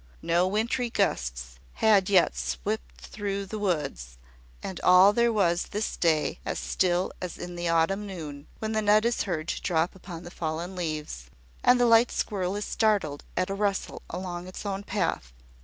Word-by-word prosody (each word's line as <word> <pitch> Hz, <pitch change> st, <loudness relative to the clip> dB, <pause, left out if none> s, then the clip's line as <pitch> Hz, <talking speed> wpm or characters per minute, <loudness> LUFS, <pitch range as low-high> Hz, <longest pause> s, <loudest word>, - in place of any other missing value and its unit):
No 175 Hz, +2 st, +2 dB
wintry 230 Hz, +5 st, 0 dB
gusts -, -, -1 dB
had 205 Hz, -4 st, +4 dB
yet 185 Hz, -, +4 dB
swept -, -, -4 dB
through 200 Hz, -, -4 dB
the 215 Hz, +2 st, -6 dB
woods; 150 Hz, -, -2 dB, 0.5 s
and 190 Hz, -, -5 dB
all 185 Hz, +3 st, +7 dB
there 235 Hz, +1 st, +3 dB
was 175 Hz, -5 st, +2 dB
this 210 Hz, +1 st, -3 dB
day 160 Hz, -3 st, +1 dB
as -, -, -3 dB
still 175 Hz, -, 0 dB
as 180 Hz, -2 st, -5 dB
in 175 Hz, 0 st, -7 dB
the 175 Hz, -1 st, -2 dB
autumn 165 Hz, +5 st, +1 dB
noon, 150 Hz, -6 st, -7 dB
when 220 Hz, 0 st, -3 dB
the 220 Hz, 0 st, +1 dB
nut 210 Hz, +1 st, +4 dB
is 235 Hz, 0 st, +1 dB
heard 160 Hz, -2 st, -2 dB
to -, -, -2 dB
drop 165 Hz, +1 st, +1 dB
upon 180 Hz, -3 st, -9 dB
the 175 Hz, -, -9 dB
fallen 170 Hz, +3 st, -4 dB
leaves, 155 Hz, -, -4 dB, 0.3 s
and 250 Hz, 0 st, +5 dB
the 245 Hz, -, +5 dB
light 230 Hz, +1 st, +5 dB
squirrel 190 Hz, -3 st, -1 dB
is 205 Hz, 0 st, -3 dB
startled 200 Hz, -10 st, +1 dB
at 185 Hz, 0 st, +1 dB
the -, -, -1 dB
rustle 200 Hz, -1 st, -1 dB
along 180 Hz, 0 st, -5 dB
its 185 Hz, -, -8 dB
own 195 Hz, -1 st, -2 dB
path. 180 Hz, -, -2 dB
180 Hz, 175 wpm, -27 LUFS, 160-205 Hz, 0.5 s, all